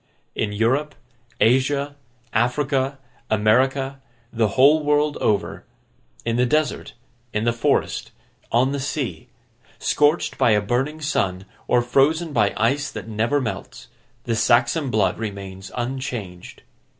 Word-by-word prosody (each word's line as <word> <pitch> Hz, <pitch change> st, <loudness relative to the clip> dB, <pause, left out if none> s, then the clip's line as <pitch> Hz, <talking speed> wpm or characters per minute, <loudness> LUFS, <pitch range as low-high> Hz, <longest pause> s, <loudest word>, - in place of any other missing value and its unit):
In 105 Hz, -, -2 dB
Europe, 130 Hz, +8 st, 0 dB, 0.4 s
Asia, 140 Hz, +4 st, +2 dB, 0.4 s
Africa, 135 Hz, +3 st, 0 dB, 0.3 s
America, 130 Hz, +6 st, +2 dB, 0.3 s
the 115 Hz, -2 st, +2 dB
whole 145 Hz, +4 st, +6 dB
world 150 Hz, 0 st, +2 dB
over; 105 Hz, -2 st, -1 dB, 0.6 s
in 115 Hz, 0 st, 0 dB
the 125 Hz, -, +3 dB
desert, 155 Hz, +3 st, 0 dB, 0.4 s
in 105 Hz, -, 0 dB
the 120 Hz, 0 st, +2 dB
forest, 115 Hz, -, 0 dB, 0.4 s
on 125 Hz, +3 st, +3 dB
the 140 Hz, -, -2 dB
sea; 130 Hz, -, -3 dB, 0.5 s
scorched 150 Hz, +3 st, +1 dB
by 115 Hz, -, +4 dB
a 105 Hz, -, +4 dB
burning 130 Hz, +9 st, -1 dB
sun, 95 Hz, -, -1 dB, 0.2 s
or 120 Hz, -1 st, +3 dB
frozen 150 Hz, +6 st, +2 dB
by 105 Hz, -5 st, +3 dB
ice 140 Hz, +7 st, +1 dB
that -, -, -8 dB
never 115 Hz, +6 st, 0 dB
melts; 130 Hz, -, -6 dB, 0.3 s
the 115 Hz, -, -1 dB
Saxon 120 Hz, +5 st, +2 dB
blood 105 Hz, -4 st, +1 dB
remains 100 Hz, -3 st, -6 dB
unchanged. 120 Hz, -8 st, -5 dB
125 Hz, 125 wpm, -22 LUFS, 110-140 Hz, 0.6 s, whole